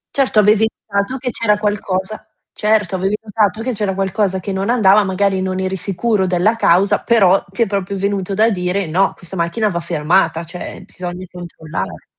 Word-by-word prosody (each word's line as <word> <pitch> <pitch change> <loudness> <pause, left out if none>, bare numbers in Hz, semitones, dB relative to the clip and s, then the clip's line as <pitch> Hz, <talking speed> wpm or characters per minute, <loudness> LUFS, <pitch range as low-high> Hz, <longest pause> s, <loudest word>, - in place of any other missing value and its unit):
Certo, 270 -5 +1
avevi 215 +1 +5 0.2
notato 200 +6 -1
che 250 -1 -3
c'era 210 -2 +1
qualcosa 205 -1 -2 0.3
certo, 210 -1 +1
avevi 195 +3 0
notato 215 -1 -1
che 255 - -1
c'era 200 -2 -2
qualcosa 195 0 0
che 195 - -5
non 195 +3 -2
andava, 210 -4 +5
magari 190 0 0
non 185 0 -2
eri 190 0 -2
sicuro 195 +2 -1
della 185 +5 +2
causa, 195 -2 +3
però 195 -5 +4
ti 190 - +1
è - - 0
proprio 200 -1 -3
venuto 195 0 -2
da 220 +2 +3
dire: 180 +1 -1
"No, 185 +5 +1
questa 180 +1 -10
macchina 190 +6 0
va 170 - -2
fermata, 165 0 +1
cioè 175 +2 -8
bisogna 180 0 -7
controllare". 170 -3 -7
195 Hz, 175 wpm, -17 LUFS, 185-210 Hz, 0.3 s, avevi